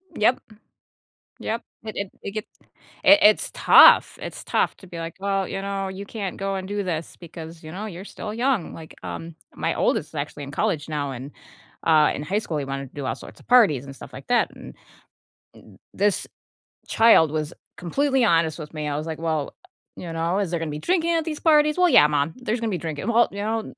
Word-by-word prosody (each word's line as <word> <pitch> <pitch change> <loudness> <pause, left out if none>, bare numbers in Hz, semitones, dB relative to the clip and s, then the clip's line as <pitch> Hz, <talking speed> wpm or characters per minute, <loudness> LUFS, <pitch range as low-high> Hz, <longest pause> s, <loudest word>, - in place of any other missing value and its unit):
Yep. 230 +4 +3 1.0
Yep, 230 +2 -3 0.2
it 215 -2 -7
it 200 -1 -3
it - - -5
gets 215 +3 -8 0.4
it 300 - +8
it's 210 0 +4
tough, - - +7
it's - - -7
tough - - 0
to 190 - -15
be 175 -2 -9
like, 165 0 -6
"Well, 195 -1 -1
you 195 - -4
know, 195 0 -3
you 190 +1 -7
can't 200 -4 -5
go 195 0 -2
and 190 -1 -5
do 205 0 -2
this 165 -3 -4
because, 165 -1 -10
you 155 0 -9
know, 200 +5 -5
you're 185 -2 -8
still 210 +1 -7
young," 240 -4 0
like, 160 -1 -11
um, 165 0 -7 0.2
my - - -1
oldest - - 0
is - - -22
actually 145 - -5
in 140 - -9
college 150 +1 -1
now, 145 -2 -2
and, 135 +2 -8 0.5
uh, 155 -2 +5
in - - -5
high 190 +8 -1
school, 165 -8 -3
he 145 - -2
wanted 135 0 -5
to - - -31
do 145 - -5
all 130 - -2
sorts - - -13
of - - -21
parties 205 - +5
and 135 0 -10
stuff - - -11
like 135 - -11
that, 245 -1 +2
and - - -11 1.0
and - - -19
this 205 0 +1 0.6
child 225 -9 +5
was 155 0 -3 0.2
completely 265 - +1
honest 165 -3 +2
with 150 0 -9
me, 150 -1 -4
I 145 - -2
was 155 +2 -4
like, 160 -1 -5
"Well, 160 -3 -2 0.4
you 170 - -7
know, 165 +4 0
is 195 -4 -2
there 170 - -1
gonna 165 -1 -3
be 150 - -5
drinking 340 - +1
at 325 - +1
these 310 -2 -4
parties?" 300 -1 +4
"Well, 360 -1 +4
yeah, 150 - +7
mom, 150 +1 0
there's 245 -2 -2
gonna 225 -1 -2
be 185 - -1
drinking." 160 +1 -5
"Well, 235 0 +4
you 200 - -9
know, 220 +1 -3
185 Hz, 220 wpm, -23 LUFS, 155-215 Hz, 1.0 s, it